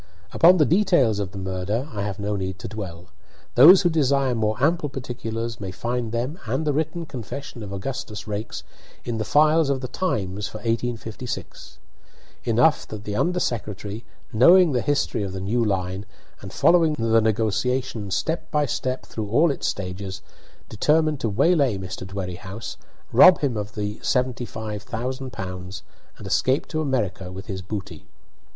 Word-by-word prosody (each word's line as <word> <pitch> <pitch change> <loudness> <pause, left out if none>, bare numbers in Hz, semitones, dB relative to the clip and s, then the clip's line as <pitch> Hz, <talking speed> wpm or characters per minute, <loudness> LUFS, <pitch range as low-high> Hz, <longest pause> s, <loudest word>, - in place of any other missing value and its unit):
Upon 180 +3 +7
the 155 - +5
details 160 - +3
of 100 -2 -3
the 100 - -9
murder 95 +7 -2
I 100 - -3
have 100 -1 -3
no 105 0 -2
need 95 -1 -3
to 95 - -7
dwell. 90 -5 -7 0.4
Those 175 +10 +9
who 175 - +4
desire 140 -4 +2
more 110 -2 0
ample 155 +2 +2
particulars 115 -3 -5
may 95 - -4
find 120 +4 -3
them, 125 +9 -3
and 130 +8 -1
the 150 - +1
written 160 +3 -2
confession 125 -1 -7
of 100 -2 -7
Augustus 105 +1 -5
Raikes, 105 +1 -4 0.4
in 115 -2 -2
the - - 0
files 155 +4 +4
of 135 -1 +1
the 130 - -3
"Times" 105 - -2
for - - -7
1856. 115 +1 -4 0.7
Enough 125 +7 +3
that 105 -1 -7
the 105 -1 -4
under 180 +10 +1
secretary, 105 - -3 0.3
knowing 170 +9 +7
the 125 -3 +1
history 140 -4 0
of 100 -2 -3
the 95 - -4
new 110 +6 0
line, 95 -1 -2 0.3
and - - -8
following 165 -3 +4
the 115 -3 +3
negotiation 110 +1 0
step 160 - -2
by 150 -1 +2
step 130 0 -3
through 110 -2 -5
all 150 +9 +4
its 140 - -3
stages, 95 0 -4 0.4
determined 150 +6 +2
to 115 - -1
waylay 140 - +3
Mr. 95 0 -6
Dwerrihouse, 95 +2 -6 0.4
rob 185 -1 +8
him 135 -5 0
of 105 0 -5
the 105 0 -3
seventy 125 -1 0
five 110 -2 -6
thousand 125 +5 -4
pounds, 95 +1 -6 0.3
and - - -10
escape 130 +3 +1
to 155 - -1
America 105 - -2
with 95 +2 -8
his 95 -3 -5
booty. 95 +1 -7
115 Hz, 165 wpm, -24 LUFS, 100-140 Hz, 0.7 s, Those